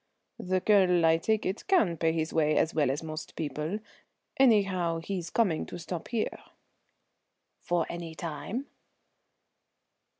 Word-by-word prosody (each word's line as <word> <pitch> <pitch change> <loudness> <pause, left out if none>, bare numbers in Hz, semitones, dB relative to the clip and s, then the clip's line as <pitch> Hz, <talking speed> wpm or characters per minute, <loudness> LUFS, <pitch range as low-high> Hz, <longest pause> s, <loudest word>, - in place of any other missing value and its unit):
"The 185 0 0
Colonel, 180 -5 +4
I 165 0 +5
take 220 +6 0
it, 190 +3 -3
can 225 - +3
pay 165 0 +1
his 160 -1 -2
way 155 -1 +2
as 160 - +2
well 150 -4 +2
as 140 +4 -2
most 155 0 -7
people. 155 +4 -3 0.6
Anyhow, 195 -9 +3
he's 175 0 -4
coming 185 -6 +1
to - - -7
stop 170 0 -6
here." 230 -3 -2 1.2
"For 175 -2 0
any 170 -2 -6
time?" 175 - -4
170 Hz, 135 wpm, -29 LUFS, 160-195 Hz, 1.2 s, I